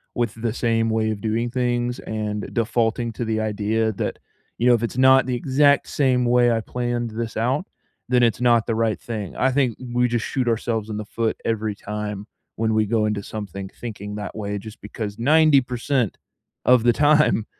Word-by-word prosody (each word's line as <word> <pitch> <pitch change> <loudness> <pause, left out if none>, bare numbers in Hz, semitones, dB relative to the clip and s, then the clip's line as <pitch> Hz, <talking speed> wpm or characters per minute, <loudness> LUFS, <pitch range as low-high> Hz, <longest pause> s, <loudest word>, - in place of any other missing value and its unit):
with 120 -3 0
the 115 -2 -1
same 115 -2 +1
way 110 0 +1
of 105 - -4
doing 115 +2 -1
things 120 -1 -1
and 105 -1 -4
defaulting 115 0 0
to 120 - -4
the 110 0 -1
idea 110 +1 0
that, - - -3 0.4
you 120 - +1
know, 125 - +7
"If 120 0 +1
it's 120 - -3
not 130 0 +6
the 125 -1 -1
exact 140 +3 +3
same 130 -3 +2
way 120 0 +4
I 115 -1 +1
planned 120 -1 -3
this 115 +1 -4
out, 130 - 0 0.4
then 125 -1 +3
it's 115 +1 +1
not 120 -2 +4
the 115 - -1
right 115 -2 0
thing." 105 -5 -6
I 130 0 +2
think 130 -4 +1 0.2
we 125 0 +3
just 120 -1 -1
shoot 130 -3 -2
ourselves 115 -1 -1
in 105 - -4
the 105 - -5
foot 115 +1 -1
every 110 -2 -1
time 105 0 -5 0.3
when 110 0 0
we 110 0 +2
go 110 0 +1
into 105 -2 -2
something 100 -2 -6
thinking 105 -3 -7
that 105 0 -6
way 105 -1 -3
just 110 +2 -10
because 105 0 -6
90% 135 -4 +2 0.5
of 125 -2 +5
the 120 -1 +4
time, 150 -7 +3
115 Hz, 195 wpm, -22 LUFS, 110-125 Hz, 0.5 s, know